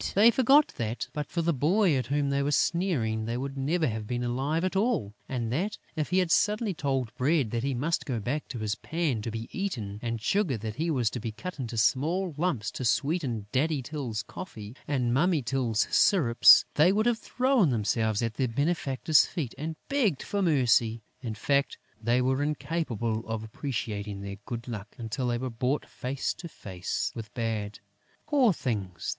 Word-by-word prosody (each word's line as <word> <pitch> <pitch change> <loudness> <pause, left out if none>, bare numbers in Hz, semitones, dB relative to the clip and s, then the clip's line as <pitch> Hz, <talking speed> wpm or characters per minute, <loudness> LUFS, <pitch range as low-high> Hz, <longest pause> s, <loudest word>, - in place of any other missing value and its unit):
They 215 +4 +7
forgot 270 +5 +5
that, 115 +1 -3
but 150 -1 -3
for 170 - -2
the 170 +1 +2
boy 170 - +3
at 130 -3 -1
whom 140 +1 0
they 140 0 +1
were 140 - 0
sneering, 130 - +1
they 115 +2 -2
would 135 +2 -4
never 155 +5 0
have 110 -4 -3
been 125 +1 -2
alive 135 +7 -1
at 185 +1 -1
all; 200 - +1 0.2
and 120 -3 -2
that, 200 +8 -1 0.2
if 155 -2 -2
he 180 - +1
had 180 -3 +2
suddenly 210 0 +2
told 135 -7 -1
Bread 135 -3 +1
that 115 - -1
he 135 +1 -1
must 150 +8 -1
go 125 -5 -1
back 140 +8 -3
to 125 - -6
his 110 -2 -1
pan 150 -2 -2
to 115 - -4
be 115 +1 -5
eaten 115 - -3
and 115 -1 -2
Sugar 180 - +1
that 110 +1 -6
he 165 +2 0
was 125 -7 +1
to 125 - -4
be 115 0 -4
cut 175 +9 -7
into 120 -3 -4
small 160 - +1
lumps 145 - -1
to - - -5
sweeten 130 - 0
Daddy 145 +1 +1
Tyl's 125 -6 -4
coffee 110 - -9
and 125 -5 +1
Mummy 155 +1 +2
Tyl's 115 -3 0
syrups, 140 - +6
they 160 +5 +5
would 215 +3 +1
have 240 -2 +2
thrown 255 - +2
themselves 110 -1 0
at 115 -1 -1
their 130 +3 0
benefactor's 140 +2 +2
feet 140 -9 -4
and 155 +3 -4
begged 230 - +1
for 205 - -2
mercy. 120 - +3 0.2
In 115 -4 -4
fact, 140 +5 +1 0.2
they 120 +2 +2
were 130 +2 +1
incapable 140 -7 -2
of 110 -1 -3
appreciating 105 -4 -4
their 100 0 -6
good 120 0 -5
luck 105 -3 -7
until 120 +2 -3
they 120 -1 0
were 130 +1 -4
brought 125 +5 -1
face 130 +2 -3
to 170 - -7
face 95 - -4
with 110 -3 -7
bad. 110 -3 -2 0.5
Poor 280 -7 +4
things! 105 - -3
130 Hz, 190 wpm, -28 LUFS, 115-165 Hz, 0.5 s, They